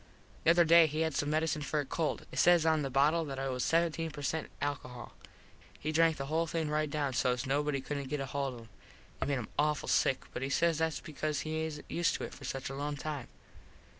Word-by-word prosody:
The - - +6
other 170 0 +6
day 165 0 +7
he 155 +1 -2
had 160 -1 +1
some 145 - 0
medecine 155 0 0
for 150 +1 -1
a 145 - -1
cold. 155 +3 -2
It - - -3
says 175 -2 +5
on 160 -1 +3
the 135 - -2
bottle 145 +5 +3
that 135 -2 -5
it 135 0 -2
was 125 -1 -2
17 165 -1 +1
per 150 -2 -8
cent 155 +3 -2
alcohol. 130 -4 -4 0.7
He 155 - -2
drank 165 0 +3
the 135 - -3
whole 160 +4 0
thing 160 -1 -1
right 155 0 +1
down 145 -2 -1
sos 125 +1 +1
nobody 140 +1 0
couldnt 140 -1 -4
get 150 - -2
hold 135 -1 -2
of - - -9
it. 115 - -14 0.5
It - - 0
made 140 - +1
him 120 - -5
awful 150 0 +1
sick 135 - +2
but - - -4
he 135 - -2
says 165 +2 +2
thats 160 -1 0
because 155 -1 -3
he 160 0 -2
isnt 150 -2 -7
used 170 0 +1
to - - -4
it - - -6
for 140 - -10
such 135 +1 -4
a - - -5
long 145 +1 -3
time. 145 -3 -4
150 Hz, 240 wpm, -32 LUFS, 135-160 Hz, 0.7 s, day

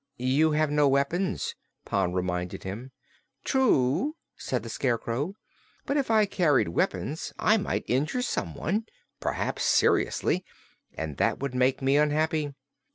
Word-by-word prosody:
"You 135 +6 +2
have 155 -1 +2
no 150 -1 +4
weapons," 140 +8 0 0.3
Pon 90 - 0
reminded 90 -1 -2
him. 105 +7 -6 0.5
"True," 260 - +2 0.2
said - - -3
the - - -7
Scarecrow. 130 - -1 0.5
"But 280 - -1
if 280 -4 0
I 220 -2 +5
carried 155 - +2
weapons 95 - -1
I 215 +1 +4
might 200 - -2
injure 150 - 0
someone 205 - -2 0.3
perhaps - - -2
seriously - - +2 0.5
and 80 -3 -5
that - - +2
would 140 -1 -4
make 130 +1 +1
me 135 +2 +4
unhappy. 150 0 +1
145 Hz, 130 wpm, -27 LUFS, 125-180 Hz, 0.5 s, I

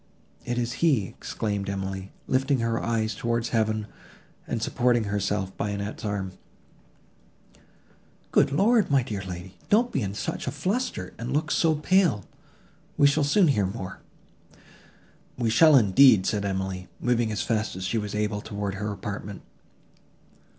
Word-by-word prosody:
"It 120 0 -2
is 120 0 -1
he!" 140 - +3
exclaimed 100 +1 -4
Emily, 95 -1 -4
lifting 135 +1 +1
her 115 -1 -1
eyes 110 -1 0
towards 115 +2 -1
heaven 110 -2 0 0.6
and - - -2
supporting 120 -1 +1
herself 100 -1 -2
by 105 - -2
Annette's 100 +1 -5
arm. 100 -3 -2 2.0
"Good - - +4
Lord! 215 - +3
my 135 -3 +3
dear 105 -5 -4
lady, 90 0 -8
don't 235 +4 +3
be - - -1
in 100 -1 -3
such - - -4
a - - 0
fluster, 180 - -2
and 120 +2 -4
look 155 +3 0
so 160 -2 +3
pale, 150 - +2 0.7
we 145 - +5
shall 145 +2 +4
soon 165 +5 +4
hear 105 -8 +2
more." 95 -2 -6 1.4
"We 115 -3 0
shall, 155 +5 +6
indeed!" 110 -2 +6
said 105 -2 0
Emily, 95 -1 -3
moving 120 -2 +1
as 105 - -2
fast 110 -4 -1
as 95 - -5
she 115 - 0
was 105 -1 -4
able 105 0 -1
towards 100 -2 -4
her 105 +1 -3
apartment. 100 0 -6
110 Hz, 150 wpm, -26 LUFS, 100-135 Hz, 2.0 s, shall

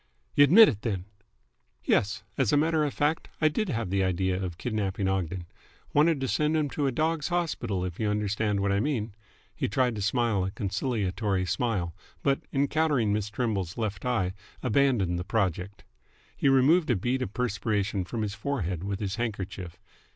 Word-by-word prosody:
"Y' - - +4
admit 190 +11 +9
it, 105 -6 -1
then?" 95 -6 -2 0.8
"Yes. 105 -1 +1
As 130 -6 +1
a 145 - +4
matter 160 +1 +2
of 145 - 0
fact, 150 +4 0
I 155 - +4
did 210 +6 -1
have 115 - -2
the 95 0 +2
idea 95 0 0
of 90 -3 -4
kidnapping 100 -3 -2
Ogden. 95 -2 -2 0.5
Wanted 150 0 +4
to 135 - 0
send 150 +4 +1
him 145 -3 0
to 145 -2 0
a - - +1
dogs' 155 +2 0
hospital, 160 - -1
if 90 -2 -6
you 110 - +1
understand 105 0 0
what 100 0 +1
I 100 - +2
mean." 115 -5 -1 0.4
He - - -1
tried 125 +1 +1
to - - -3
smile 110 -1 +1
a 95 - -1
conciliatory 100 -1 -1
smile, 95 -5 -1 0.3
but, 140 0 +2
encountering 140 -5 +2
Miss 105 -1 -1
Trimble's 105 -6 -2
left 105 -4 -3
eye, 110 -7 0 0.3
abandoned 120 -8 +2
the - - -3
project. 100 -1 -2 0.5
He 140 - +2
removed 140 +6 +4
a 120 - +4
bead 125 +7 -1
of 105 -5 -4
perspiration 105 -4 -1
from 110 +5 -3
his 100 -2 -3
forehead 100 - -3
with 100 0 -3
his 100 0 -3
handkerchief. 100 -6 -4
105 Hz, 180 wpm, -28 LUFS, 95-135 Hz, 0.8 s, admit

